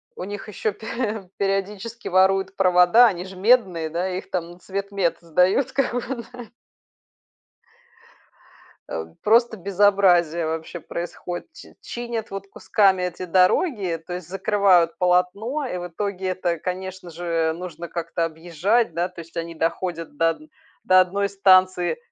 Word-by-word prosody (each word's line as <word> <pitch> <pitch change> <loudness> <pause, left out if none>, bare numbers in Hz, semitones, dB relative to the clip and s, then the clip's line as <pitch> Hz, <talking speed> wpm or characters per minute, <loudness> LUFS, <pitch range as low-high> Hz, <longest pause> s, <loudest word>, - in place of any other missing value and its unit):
У - - -6
них 205 +2 -7
ещё 210 +1 -2
пе 220 -2 -4
периодически 200 +4 -3
воруют 190 +1 +2
провода, 185 +4 +6
они 180 -6 0
ж 190 0 -10
медные, 185 -6 +2
да, 175 +4 -2
их 185 +1 -6
там 175 -2 -3
на 175 - -15
цветмет 195 -1 -2
сдают, 180 - +2
как 265 -3 0
бы, 245 0 -3
да. 245 -2 -9 2.4
Э, 80 - -3 0.2
просто 230 +1 +4
безобразие 185 -4 +3
вообще 160 +2 -4
происходит. 175 +2 -6
Чи 340 - -14
чинят 235 -2 -5
вот 195 0 -7
кусками 195 -3 +2
эти 180 0 -4
дороги, 185 - +2
то 180 - -5
есть, 180 -2 -7
закрывают 190 -3 +3
полотно, 190 +10 +1
и 245 - -4
в 175 0 -6
итоге 190 +1 -3
это, 180 -2 -1
конечно 185 +1 -5
же, 165 -1 -1
нужно 170 0 -7
как-то 170 0 -3
объезжать, 170 +6 0
да, 175 +2 0
то 180 -2 -11
есть 165 0 -13
они 170 0 -4
доходят 165 -1 -3
до 165 +2 +3
од 165 - -6 0.4
до 185 0 +6
одной 200 +2 +1
станции, 185 - +3
185 Hz, 145 wpm, -23 LUFS, 175-200 Hz, 2.4 s, провода